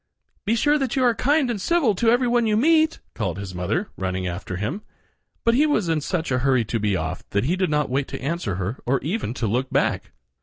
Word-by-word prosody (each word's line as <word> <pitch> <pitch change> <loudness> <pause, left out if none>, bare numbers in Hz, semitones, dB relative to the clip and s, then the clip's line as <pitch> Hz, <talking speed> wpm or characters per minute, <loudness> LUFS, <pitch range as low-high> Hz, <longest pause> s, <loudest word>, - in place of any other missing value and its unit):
"Be 225 - +3
sure 295 +6 +3
that 270 -1 -1
you 265 - +2
are 240 -2 +4
kind 280 +2 +2
and 205 -5 -4
civil 310 - +2
to 225 +5 +2
every 245 +2 +3
one 240 -1 +2
you 215 -1 +2
meet," 315 +5 +3 0.2
called 95 -6 -3
his 100 -2 -6
mother, 90 - -2
running 95 -1 -2
after 90 +1 -4
him; 115 - -3 0.6
but 230 - +3
he 290 +6 +4
was 215 - +1
in 160 -2 +1
such 165 -1 -2
a 125 - +2
hurry 130 -3 +2
to 115 +1 -2
be 105 -2 +1
off 85 +1 -4
that 100 +1 0
he 170 +6 +1
did 185 -1 0
not 150 -1 +1
wait 135 +2 -1
to - - -6
answer 140 - -2
her 100 +6 -3
or 135 +2 +2
even 160 - -2
to 120 - -2
look 125 +5 0
back. - - 0
160 Hz, 240 wpm, -23 LUFS, -, 0.6 s, are